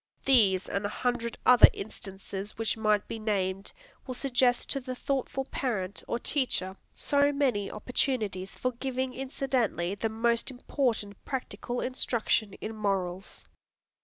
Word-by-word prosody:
These 205 -8 +4
and 200 - -2
a 205 - 0
hundred 240 +1 -1
other 250 -2 +10
instances 195 0 -7
which 225 0 0
might 215 -2 +2
be 225 - -5
named, 195 -3 -1 0.4
will 255 - -3
suggest 250 -2 +2
to 275 - +1
the 255 -1 -5
thoughtful 270 0 -2
parent 200 -10 -2
or - - 0
teacher 240 -8 0 0.2
so 285 0 +3
many 260 -8 +1
opportunities 210 -4 -1
for 255 - 0
giving 260 +1 -2
incidentally 260 -9 -1
the 215 +3 -1
most 230 +2 +1
important 245 -5 -2
practical 250 -2 -3
instruction 235 -5 +1
in 220 +2 -6
morals. 195 -3 -2
230 Hz, 130 wpm, -29 LUFS, 200-255 Hz, 0.4 s, other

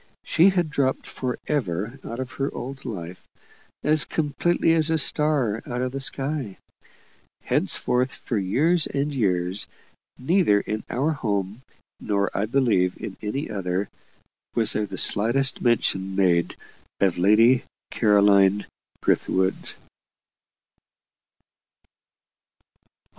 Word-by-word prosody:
She 170 +4 +4
had 175 -5 0
dropped 135 -2 0
for 125 -2 -4
ever 115 - -2
out 115 - -7
of 130 -1 -5
her 135 +2 -3
old 135 +2 -7
life, 90 -5 -7 0.6
as 155 +1 +3
completely 165 +2 0
as 160 -1 +2
a 160 - +2
star 145 -8 +3
out 125 +1 -3
of 130 - -2
the 135 - -4
sky. 135 -3 -2 0.9
Henceforth, 125 +1 0
for 120 - -5
years 150 - +2
and 145 +1 -2
years, 95 -5 -1 0.5
neither 145 - +2
in 110 +1 -4
our 140 +6 0
home, 105 -5 -3 0.4
nor, 100 -1 -1
I 105 - 0
believe, 110 -8 +1
in 95 - -6
any 135 +8 -3
other, 95 -1 -2 0.7
was 115 -2 +1
there 105 -1 -1
the - - -7
slightest 130 +6 +3
mention 95 -5 0
made 90 -3 +2 0.4
of 95 -3 +1
Lady 115 +7 +5 0.3
Caroline 100 -2 +4 0.4
Brithwood. 95 0 0
120 Hz, 115 wpm, -24 LUFS, 100-140 Hz, 0.9 s, Lady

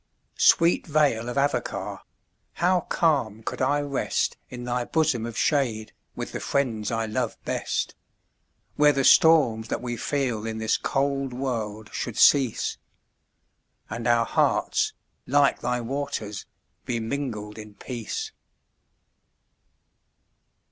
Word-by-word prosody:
Sweet 170 +2 +4
vale 140 -7 +2
of 120 - -4
Avoca! 140 +1 -1 0.5
how 180 +1 +2
calm 135 - +1
could - - -4
I 145 +3 +2
rest 140 -2 -1
In 125 -1 -7
thy 125 0 -1
bosom 125 -5 0
of 115 - -7
shade, 120 -8 0 0.2
with - - -5
the - - -4
friends 115 -7 -1
I 115 -1 -1
love 110 0 -2
best, - - -2 0.8
Where 150 0 +5
the 135 0 0
storms 130 -9 +5
that - - -2
we 120 -1 -4
feel 130 -7 -1
in 110 0 -4
this 110 0 +1
cold 135 -1 -1
world 110 -5 -4
should 120 - -4
cease, 135 -5 +4 1.1
And 115 +2 -3
our 120 -1 +4
hearts, - - +1 0.3
like 140 0 +3
thy 125 0 -1
waters, 115 -5 -4 0.4
be 120 -2 -2
mingled 110 -4 -4
in 105 -1 -11
peace. 135 - -5
125 Hz, 120 wpm, -25 LUFS, 110-140 Hz, 1.1 s, Where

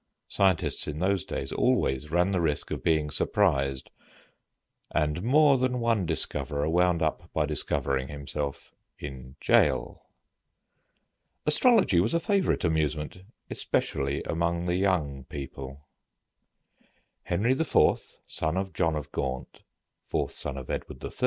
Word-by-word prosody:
Scientists 95 -4 +1
in 75 - -4
those 95 +2 +1
days - - -4
always 65 +3 +1
ran 90 +4 +2
the 95 -3 +1
risk 75 -3 -1
of - - -3
being 80 -2 +2
surprised, 70 -11 +1 1.0
and 75 +1 0
more 140 +4 +5
than 125 0 0
one 115 -6 +1
discoverer 75 -2 -1
wound 90 0 +2
up 85 +2 -2
by 75 - +1
discovering 70 -2 -1
himself 70 0 -5 0.2
in 65 -2 -8
jail. - - +2 1.4
Astrology 190 - +4
was 95 - +1
a - - +3
favorite 195 +1 +1
amusement, 80 0 -1 0.3
especially 70 +1 -1
among 85 +1 -1
the 90 0 0
young 80 -9 0
people. 70 0 -8 1.4
Henry 100 +8 +1
IV., 140 +4 -1 0.5
son 80 +3 -2
of 95 0 -2
John 80 -3 +1
of 75 -2 -5
Gaunt, 65 -1 -4 0.5
fourth - - -1
son 70 -2 -2
of 65 - -6
Edward - - -5
III. - - -4
80 Hz, 125 wpm, -28 LUFS, 70-95 Hz, 1.4 s, more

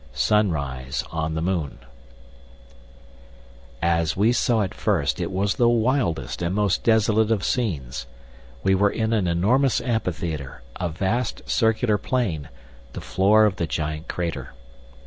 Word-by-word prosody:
VII. 70 -2 -23
Sunrise 70 - 0
on 80 -1 -2
the 80 - -2
Moon 85 -6 -2 2.1
As 85 -1 +1
we 105 +4 +4
saw 120 -3 +2
it 95 - -2
first - - 0
it - - -2
was 95 +1 0
the 120 -1 +3
wildest 120 - 0
and 85 +2 -1
most 105 -2 +1
desolate 110 -1 +3
of 110 -4 +1
scenes. 70 - -2 0.6
We 95 - +3
were 100 +2 +3
in 110 +2 -1
an 100 -5 +1
enormous 115 +11 +2
amphitheatre, 85 - -3
a 90 -2 -2
vast 100 +10 -2
circular 110 -2 +2
plain, 90 - -2 0.4
the - - -6
floor 105 +3 +4
of 100 -4 0
the 85 - -1
giant 75 +1 -3
crater. 80 -7 -4
95 Hz, 140 wpm, -23 LUFS, 80-110 Hz, 2.1 s, we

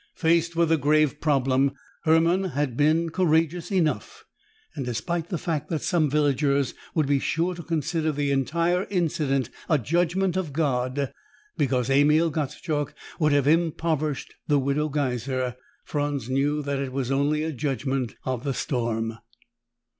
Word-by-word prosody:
Faced 170 0 +2
with 165 -1 +2
a 160 - +5
grave 150 0 +2
problem, 135 -2 +2 0.3
Hermann 165 +4 +4
had 145 -4 0
been 160 +4 +2
courageous 165 0 +1
enough, 195 - -1 0.5
and, 140 - -4
despite 125 +8 -3
the 175 - -1
fact 155 -3 -3
that 160 -3 -2
some 165 -5 +2
villagers 140 -2 +1 0.2
would 155 -3 +3
be 140 0 +2
sure 170 +6 0
to 170 - -7
consider 160 0 -1
the 145 -1 -1
entire 170 +7 +1
incident 155 -8 0 0.2
a 155 - +4
judgment 175 - +1
of 180 -7 -2
God 135 -2 0 0.4
because 130 -2 0
Emil 150 +4 +4
Gottschalk 150 0 -2 0.2
would 155 -2 +3
have 145 -2 +3
impoverished 155 -2 0
the 145 - +3
Widow 140 +3 0
Geiser, 130 -3 -1 0.3
Franz 145 -4 -2
knew 145 +3 +1
that 140 -1 -2
it 135 -2 -3
was 130 -1 -2
only 145 +3 +1
a 160 - -2
judgment 135 -3 -2
of 130 -2 -2
the 140 -3 -2
storm. 115 -3 -2
150 Hz, 145 wpm, -25 LUFS, 135-165 Hz, 0.5 s, a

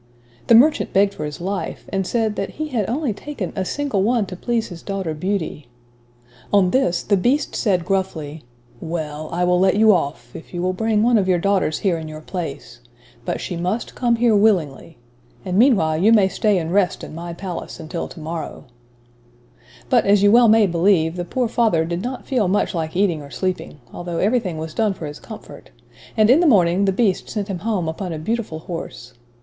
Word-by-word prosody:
The 230 - +7
merchant 295 +6 +4
begged 200 +1 +3
for 150 - -5
his 150 +3 -6
life, 195 +3 -4
and 195 -1 -1
said, 220 -3 0
that 195 - -4
he 310 0 -3
had 225 -8 -1
only 265 -1 -1
taken 215 -3 -6
"a 190 - -1
single 275 -1 -1
one 225 +1 +2
to 185 - -8
please 230 +4 -2
his 170 -3 -9
daughter 195 -5 -3
Beauty." 160 -4 -3 0.8
On 195 -3 +4
this, 180 -10 +1
the 205 - +2
beast 250 +10 0
said 185 -7 +1
gruffly, 175 -6 -2 0.4
"well, 155 -2 -5
I 175 +1 -1
will 180 0 +3
let 190 +1 +3
you 215 0 +6
off, 140 -8 -3
if 160 - -10
you 175 - -2
will 185 0 0
bring 215 +2 +1
one 235 -1 +4
of 190 - 0
your 185 -1 +3
daughters 190 -3 +1
here 180 -5 0
in 160 - -7
your 155 0 -8
place. 155 - -6 0.5
But - - -2
she 180 - -5
must 180 +7 -3
come 240 -2 +1
here 230 -1 +3
willingly, 175 -8 +1 0.5
and 185 -1 -2
meanwhile 195 - +4
you 210 +6 +4
may 205 -4 +5
stay 205 +1 +1
and 165 0 -2
rest 195 -2 +1
in - - -8
my 170 +2 -6
palace 175 0 -6
until 165 +1 -5
to - - -12
morrow." 160 +1 -6 1.2
But, - - +3
as 200 0 +4
you 205 - +6
may 225 -2 +6
well - - +1
believe, 170 -2 +2
the 175 - -3
poor 250 +6 -1
father 220 -9 +2
did 170 +2 -3
not 250 +4 -5
feel 245 -8 +1
much 200 +3 +1
like 160 -2 -3
eating 180 -5 +1
or 140 - -11
sleeping; 185 -3 -4
although 175 -1 -5
everything 200 -4 0
was 160 0 -6
done 215 -3 0
for 165 - -7
his 145 0 -7
comfort, - - -11 0.5
and, 215 +1 +5
in 275 - +6
the 345 - +3
morning, 190 - +4
the 195 - +3
Beast 195 -1 0
sent 205 -2 -4
him 185 -3 -3
home 200 -4 -1
upon 175 +3 -4
a 160 - -4
beautiful 180 -1 -3
horse. 160 -8 -7
190 Hz, 205 wpm, -21 LUFS, 165-215 Hz, 1.2 s, The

